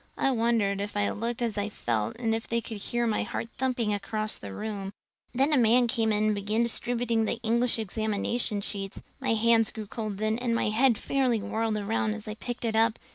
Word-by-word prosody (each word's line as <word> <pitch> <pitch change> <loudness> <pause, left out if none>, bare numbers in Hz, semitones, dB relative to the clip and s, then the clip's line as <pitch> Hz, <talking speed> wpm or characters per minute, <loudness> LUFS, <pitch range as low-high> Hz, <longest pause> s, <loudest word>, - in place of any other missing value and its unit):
I 270 - +2
wondered 225 -5 +1
if 205 0 -4
I 205 - +1
looked 235 +2 -3
as 220 -3 -1
I 205 +1 -1
felt 115 - -2
and 225 -2 0
if 225 0 -2
they 235 - +1
could 225 -1 -6
hear 240 +4 -1
my 220 -2 +1
heart 230 - -4
thumping 250 -4 0
clear 205 - +1
across 215 +1 -3
the 100 - -7
room. 200 - -4 0.4
Then 275 +5 +2
a - - +5
man 240 +2 +5
came 225 -1 +1
in 210 0 +2
and 215 0 +3
began 210 +3 0
distributing 235 -1 +1
the 230 - -2
English 235 +2 +2
examination 220 +1 -1
sheets. 195 -1 -3 0.2
My 225 - +1
hands 225 0 +4
grew 215 -1 -6
cold 215 -1 -4
then 215 +2 0
and 240 -2 0
my 230 - +1
head 235 +2 +4
fairly 255 -3 +1
whirled 220 +1 -1
around 215 +1 0
as 220 0 -7
I 215 - -3
picked 240 +2 -5
it 225 -1 0
up. 225 0 +3
225 Hz, 220 wpm, -28 LUFS, 210-235 Hz, 0.4 s, a